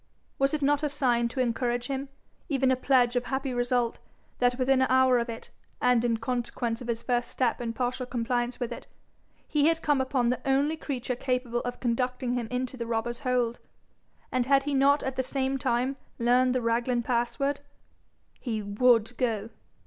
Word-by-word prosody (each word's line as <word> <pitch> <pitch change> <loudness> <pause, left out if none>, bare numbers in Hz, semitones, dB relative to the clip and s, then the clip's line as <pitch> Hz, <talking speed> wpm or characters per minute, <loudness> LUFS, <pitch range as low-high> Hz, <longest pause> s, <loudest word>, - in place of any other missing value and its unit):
Was 275 +2 +2
it 295 - -3
not 285 +1 +3
a 300 - 0
sign 245 -5 +1
to 250 +3 -6
encourage 240 0 0
him, 270 +1 -3 0.4
even 270 -2 +2
a - - +4
pledge 250 -2 +3
of 245 0 0
happy 265 0 -2
result, 245 -1 0 0.4
that, 245 0 +2
within 260 0 +3
an 260 - +3
hour 260 -1 +5
of 235 +1 -3
it, 230 0 -8 0.3
and 245 -2 +3
in 235 -1 +1
consequence 235 0 -2
of 245 - -7
his 230 -1 -2
first 245 -1 0
step 250 -2 0
in 235 -1 -2
partial 245 +2 -2
compliance 240 0 -1
with 245 -1 -3
it, - - -8 0.6
he 295 -1 +2
had 325 0 +1
come 290 -3 +2
upon 260 -2 +1
the 250 - -1
only 275 +3 +2
creature 260 -5 -3
capable 250 -2 -1
of 245 0 -5
conducting 250 +1 -1
him 245 -2 -2
into 255 +1 -3
the 235 -1 -4
robber's 235 +1 -2
hold? 250 -3 0 0.7
And 255 -1 0
had 275 0 +4
he 290 0 -2
not 280 +2 +4
at 265 0 -3
the - - +3
same 265 +1 -1
time 250 +3 0 0.2
learned 250 +2 +3
the 250 - 0
Raglan 235 +1 +1
password? 245 +4 0 0.8
He 225 -4 -3
WOULD 225 +3 +3
go. 225 -3 -1
250 Hz, 185 wpm, -28 LUFS, 240-265 Hz, 0.8 s, hour